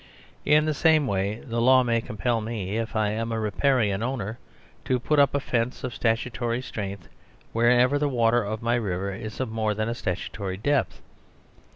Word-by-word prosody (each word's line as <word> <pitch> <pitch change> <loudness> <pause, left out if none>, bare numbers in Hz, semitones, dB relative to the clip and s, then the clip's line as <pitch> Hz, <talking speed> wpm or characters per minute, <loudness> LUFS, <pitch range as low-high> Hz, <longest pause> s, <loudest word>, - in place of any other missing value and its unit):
In 150 +1 +4
the 155 - +1
same 155 0 +3
way 100 0 -1
the 115 -1 -2
law 130 +1 +6
may 115 -1 +1
compel 115 +2 -1
me, 105 -3 -4
if 115 +1 -3
I 105 -1 +1
am 115 +2 -2
a 115 - -1
Riparian 110 -1 +1
owner, 115 -3 -3 0.5
to 130 -1 +1
put 150 +5 +1
up 140 0 +4
a - - +2
fence 120 -2 -2
of 125 - -3
statutory 120 +1 -1
strength 100 -7 -6 0.5
wherever 125 +4 +4
the 145 0 +1
water 120 -2 +2
of 110 +2 -4
my 120 +1 +1
river 100 -4 -1
is 110 +2 -7
of 130 -4 -2
more 110 -1 -1
than 110 +1 -1
a - - -1
statutory 95 -1 -4
depth. 145 +7 0
115 Hz, 185 wpm, -25 LUFS, 105-125 Hz, 0.5 s, law